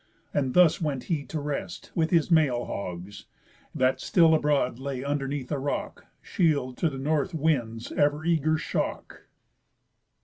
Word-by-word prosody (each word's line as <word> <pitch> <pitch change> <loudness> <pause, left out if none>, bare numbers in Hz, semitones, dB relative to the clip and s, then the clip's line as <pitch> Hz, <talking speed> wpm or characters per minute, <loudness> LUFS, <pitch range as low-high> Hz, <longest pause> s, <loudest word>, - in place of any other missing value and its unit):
And 135 -3 0
thus 175 -2 +5
went 140 -5 -2
he 150 -5 -2
to 155 - -4
rest 145 +4 -5
with 160 -1 +1
his 170 0 +2
male 140 -7 +3
hogs, 95 +1 -6 0.5
That 130 0 +1
still 165 -2 +4
abroad 145 -5 +1
lay 135 -1 -4
underneath 140 -1 -3
a 145 - -1
rock, 140 +1 -4 0.2
Shield 145 -7 0
to 165 - +1
the 135 - -7
North 150 +4 -1
wind's 125 -8 -1
ever 145 +1 +1
eager 155 -2 +2
shock. - - -4
145 Hz, 145 wpm, -27 LUFS, 130-160 Hz, 0.5 s, thus